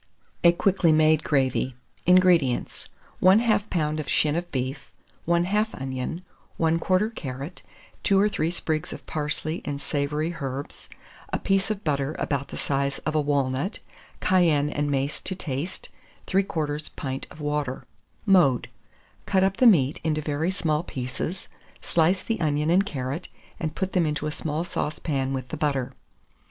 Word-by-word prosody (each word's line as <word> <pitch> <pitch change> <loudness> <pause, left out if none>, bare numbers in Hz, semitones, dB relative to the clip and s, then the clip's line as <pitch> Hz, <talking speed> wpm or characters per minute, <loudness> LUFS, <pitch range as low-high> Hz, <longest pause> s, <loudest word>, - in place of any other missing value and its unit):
A 170 - +8
QUICKLY 180 -1 +3
MADE 155 0 +4
GRAVY. 130 -2 +1 0.3
434. 180 - +7
INGREDIENTS. 170 -9 +2 0.3
1/2 210 +2 +4
lb. 155 -3 0
of 150 - -4
shin 150 -1 +2
of 175 +1 -3
beef, 130 +1 -3 0.4
1/2 190 +5 +1
onion, 135 +7 -4 0.3
1/4 185 +6 +2
carrot, 140 - -6 0.4
2 195 -1 +3
or 205 - +5
3 165 -6 0
sprigs 160 -2 -1
of - - -10
parsley 155 +1 -2
and 140 -1 -3
savoury 150 +4 -1
herbs, 135 +1 -5 0.4
a - - +1
piece 195 0 +1
of 210 -2 -3
butter 140 -1 0
about 140 -1 -1
the - - -8
size 140 0 0
of 155 - 0
a 155 - +3
walnut; 140 - 0 0.4
cayenne 160 -6 +3
and 145 0 -1
mace 140 +1 -1
to 190 - -3
taste, 155 0 -4 0.4
3/4 155 -6 -1
pint 135 -2 -4
of - - -14
water. 150 -3 -2 0.4
Mode. 175 - +4 0.6
Cut 190 -1 +3
up 195 0 +1
the 255 - +6
meat 150 - +4
into 155 -1 +1
very 150 +3 -1
small 160 -5 0
pieces, 135 +4 -5 0.3
slice 175 +3 +2
the 225 -4 -2
onion 150 0 +1
and 195 +3 +4
carrot, 140 +1 -4 0.3
and 160 -2 -3
put 190 0 -2
them 175 -4 +3
into 150 0 -2
a 150 - -1
small 155 +1 -2
saucepan 150 -5 -2
with 130 -2 -4
the 160 - -4
butter. 135 -4 -1
155 Hz, 155 wpm, -25 LUFS, 140-180 Hz, 0.6 s, A